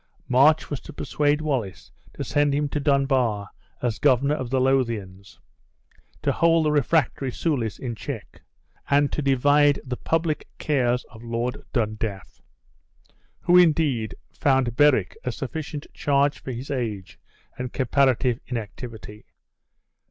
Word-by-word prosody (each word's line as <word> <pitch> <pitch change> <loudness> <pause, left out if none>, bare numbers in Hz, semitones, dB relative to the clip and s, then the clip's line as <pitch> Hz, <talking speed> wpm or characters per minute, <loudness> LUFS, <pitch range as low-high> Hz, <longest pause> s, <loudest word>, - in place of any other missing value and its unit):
March 145 +6 +4
was 145 - -2
to - - -11
persuade 150 0 0
Wallace 130 -11 -3 0.2
to - - -4
send 145 -1 +1
him 145 0 0
to 150 - -2
Dunbar 135 -8 +1 0.3
as 115 -4 -1
governor 140 0 +3
of 130 -5 -3
the 130 +1 +1
Lothiaus, 115 -8 -1 0.9
to - - +2
hold 165 -1 +3
the 150 - +2
refractory 145 -2 +1
Soulis 125 -8 -1
in 125 -3 -4
check; 110 - -8 0.5
and 145 0 +3
to - - -2
divide 145 +1 +4
the 125 -1 -4
public 165 -1 -1
cares 125 -4 +1
of 110 - -13
Lord 120 +2 -3
Dundaff; 110 -4 -3 1.0
who, 175 - +3
indeed, 150 -10 +2 0.2
found 130 -5 +1
Berwick 140 -9 +3
a 125 - -2
sufficient 145 +3 -5
charge 140 0 +1
for 130 - -6
his 125 +4 -6
age 110 -8 -4 0.4
and 125 -1 -4
comparative 130 -2 +2
inactivity. 110 -2 -7
130 Hz, 130 wpm, -24 LUFS, 115-145 Hz, 1.0 s, March